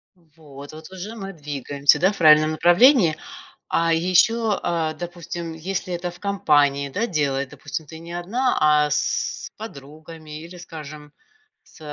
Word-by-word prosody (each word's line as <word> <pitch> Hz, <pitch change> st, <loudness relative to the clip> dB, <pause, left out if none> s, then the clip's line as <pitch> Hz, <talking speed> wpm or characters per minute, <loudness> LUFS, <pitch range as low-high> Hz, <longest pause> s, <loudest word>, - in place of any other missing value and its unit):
Вот 150 Hz, -4 st, -14 dB
вот 155 Hz, +3 st, -12 dB
уже 190 Hz, +4 st, -7 dB
мы 195 Hz, -3 st, -7 dB
двигаемся, 145 Hz, -2 st, +1 dB
да, 190 Hz, +3 st, +3 dB
в 205 Hz, -, -9 dB
правильном 155 Hz, -2 st, +6 dB
направлении. 175 Hz, -, +5 dB, 0.5 s
А 165 Hz, 0 st, +1 dB
ещё, 200 Hz, +6 st, +2 dB
а, 160 Hz, -2 st, -1 dB
допустим, 170 Hz, -1 st, -7 dB
если 180 Hz, +2 st, -4 dB
это 175 Hz, +1 st, -4 dB
в 175 Hz, -, -16 dB
компании, 145 Hz, -8 st, +2 dB
да, 215 Hz, -, -2 dB
делает, 140 Hz, -, -1 dB
допустим, 145 Hz, +1 st, -7 dB
ты 160 Hz, -, -10 dB
не 170 Hz, +1 st, -10 dB
одна, 225 Hz, +10 st, -1 dB
а 150 Hz, -1 st, +4 dB
с 150 Hz, -, -2 dB
подругами 155 Hz, -4 st, -10 dB
или, 170 Hz, +2 st, -11 dB
скажем, 150 Hz, -3 st, -10 dB, 0.5 s
с -, -, -20 dB
165 Hz, 145 wpm, -22 LUFS, 150-180 Hz, 0.5 s, правильном